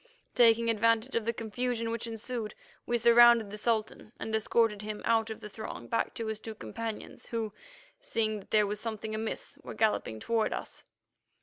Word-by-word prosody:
Taking 230 Hz, -1 st, +5 dB
advantage 230 Hz, +3 st, +2 dB
of 230 Hz, -2 st, 0 dB
the 230 Hz, -, +2 dB
confusion 230 Hz, +1 st, -2 dB
which 230 Hz, 0 st, -3 dB
ensued, 225 Hz, -1 st, -4 dB, 0.3 s
we 240 Hz, -, +2 dB
surrounded 235 Hz, -2 st, +7 dB
the 210 Hz, -, -6 dB
Sultan 220 Hz, -1 st, -1 dB
and 220 Hz, -, -4 dB
escorted 220 Hz, -1 st, +2 dB
him 210 Hz, 0 st, -5 dB
out 225 Hz, -1 st, +2 dB
of 220 Hz, -, -6 dB
the -, -, -7 dB
throng 215 Hz, +1 st, -7 dB
back 230 Hz, -, -1 dB
to 230 Hz, -, -3 dB
his 220 Hz, -1 st, -3 dB
two 220 Hz, 0 st, -7 dB
companions, 225 Hz, 0 st, -6 dB
who, 225 Hz, -2 st, -3 dB, 0.5 s
seeing 220 Hz, -, -1 dB
that 195 Hz, -, -15 dB
there 210 Hz, -1 st, +4 dB
was 205 Hz, +1 st, -3 dB
something 220 Hz, -1 st, -4 dB
amiss, 220 Hz, +1 st, -4 dB
were -, -, -8 dB
galloping 210 Hz, -, +1 dB
toward 225 Hz, -, 0 dB
us. -, -, -7 dB
225 Hz, 180 wpm, -30 LUFS, 215-230 Hz, 0.5 s, surrounded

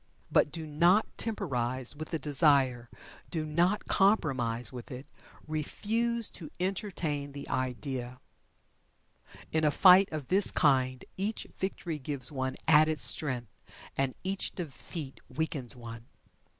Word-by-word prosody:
But 150 Hz, -, +4 dB
do 160 Hz, +1 st, -5 dB
not 170 Hz, +8 st, +3 dB
temporize 130 Hz, -, -2 dB
with 155 Hz, +1 st, -6 dB
the 165 Hz, -, -1 dB
desire 140 Hz, -5 st, +3 dB, 0.4 s
do 160 Hz, -3 st, -2 dB
not 175 Hz, +7 st, +1 dB
compromise 130 Hz, -, +1 dB
with 125 Hz, -2 st, -7 dB
it 130 Hz, +2 st, -7 dB, 0.4 s
refuse 225 Hz, +9 st, 0 dB
to 155 Hz, -4 st, -7 dB
entertain 175 Hz, -7 st, -2 dB
the 140 Hz, -, -7 dB
idea. 125 Hz, -1 st, -3 dB, 1.3 s
In 160 Hz, 0 st, +1 dB
a 150 Hz, -, +5 dB
fight 185 Hz, +5 st, +7 dB
of 155 Hz, -3 st, -4 dB
this 195 Hz, +2 st, +4 dB
kind 130 Hz, -4 st, +2 dB
each 205 Hz, +4 st, -2 dB
victory 175 Hz, -4 st, -3 dB
gives 135 Hz, -2 st, -4 dB
one 130 Hz, -2 st, -2 dB
added 155 Hz, -1 st, +5 dB
strength, 125 Hz, -8 st, +1 dB, 0.4 s
and 135 Hz, -1 st, 0 dB
each 190 Hz, +1 st, -1 dB
defeat 155 Hz, -3 st, -7 dB
weakens 135 Hz, -3 st, -3 dB
one. 115 Hz, -1 st, -9 dB
150 Hz, 125 wpm, -30 LUFS, 130-175 Hz, 1.3 s, fight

